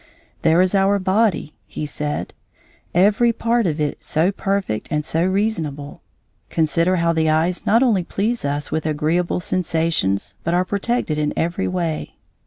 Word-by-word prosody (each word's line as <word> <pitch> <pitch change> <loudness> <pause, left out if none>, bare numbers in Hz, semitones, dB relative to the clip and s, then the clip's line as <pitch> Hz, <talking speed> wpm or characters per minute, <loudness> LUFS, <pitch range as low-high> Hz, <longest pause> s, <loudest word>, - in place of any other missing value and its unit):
"There 160 +2 +4
is 185 +1 +2
our 195 +1 +3
body," 190 -5 +1 0.3
said 150 0 -4 0.6
he: 175 - +1
"every 210 +5 +4
part 230 -1 +1
of 155 -1 -2
it 150 -1 -2
so 165 +5 +2
perfect 195 - -2
and 150 0 -1
so 165 +1 +1
reasonable. 170 -8 -2 0.5
Consider 165 +3 +2
how 170 -1 +2
the 160 -1 +1
eyes 165 +3 0
not 230 +4 +5
only 215 -8 +2
please 220 +7 -2
us 145 +1 -2
with 155 0 -1
agreeable 160 +4 0
sensations 165 - -1
but 170 +2 0
are 180 +1 +2
protected 200 -5 -1
in 150 0 0
every 170 +4 -1
way. 170 -4 -3
170 Hz, 155 wpm, -21 LUFS, 155-195 Hz, 0.6 s, not